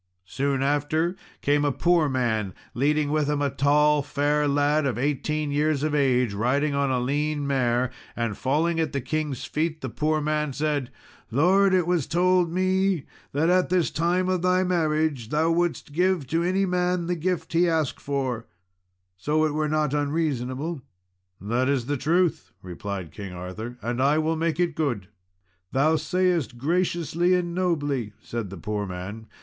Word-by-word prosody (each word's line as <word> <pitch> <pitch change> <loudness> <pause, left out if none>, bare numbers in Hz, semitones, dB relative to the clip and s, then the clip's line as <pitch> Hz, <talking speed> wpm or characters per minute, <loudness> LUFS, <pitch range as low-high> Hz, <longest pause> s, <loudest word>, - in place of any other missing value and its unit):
Soon 135 +7 -1
after 145 +5 +1 0.3
came 145 +1 +2
a 145 - +2
poor 170 +1 +2
man, 110 -7 -1 0.2
leading 145 +3 +1
with 150 -1 +1
him 150 -1 0
a 140 -1 0
tall 150 +2 +3
fair 145 +1 0
lad 145 +1 +2
of 120 -5 -2
eighteen 145 +3 -1
years 150 0 +1
of 155 -1 0
age, 125 -6 +2
riding 135 +8 +1
on 140 -1 +1
a 130 -1 +1
lean 145 +3 -1
mare. 125 -2 +1 0.2
And 115 -3 -2
falling 160 +8 0
at 160 - -1
the 140 - 0
king's 140 0 -3
feet, 155 +1 -2
the 130 - -4
poor 155 +4 0
man 150 -1 -1
said, 145 -3 -1 0.4
"Lord, 185 - +4
it 180 -2 +2
was 175 -5 0
told 180 0 +2
me, 185 -2 +1 0.3
that 160 +5 +2
at 185 0 +3
this 180 -2 +2
time 175 +3 +1
of 185 -2 0
thy 185 +1 +3
marriage 155 -8 0
thou 160 +3 +2
wouldst 175 -3 -1
give 180 -2 +1
to 165 +2 +1
any 185 +3 +1
man 180 -1 0
the 175 +1 -1
gift 170 -1 -2
he 170 +1 +4
asked 160 -4 -1
for, 130 -5 -2 0.7
so 150 +10 +1
it 155 - -1
were 155 0 0
not 150 -2 +1
unreasonable." 145 0 -1 0.6
"That 120 +6 0
is 135 -4 +1
the 145 +3 -1
truth," 160 - +1
replied 95 -1 -6
King 100 -3 -8
Arthur, 95 +7 -7
"and 120 +2 -1
I 145 +3 +3
will 160 +1 +1
make 165 0 -1
it 175 -2 +1
good." 120 -12 -2 0.6
"Thou 155 +4 +3
sayest 175 -7 0
graciously 170 +3 +1
and 175 -1 -1
nobly," 145 - -1
said 115 -4 -5
the 95 - -8
poor 105 +4 -3
man. 95 +5 -7
150 Hz, 170 wpm, -25 LUFS, 130-165 Hz, 0.7 s, Lord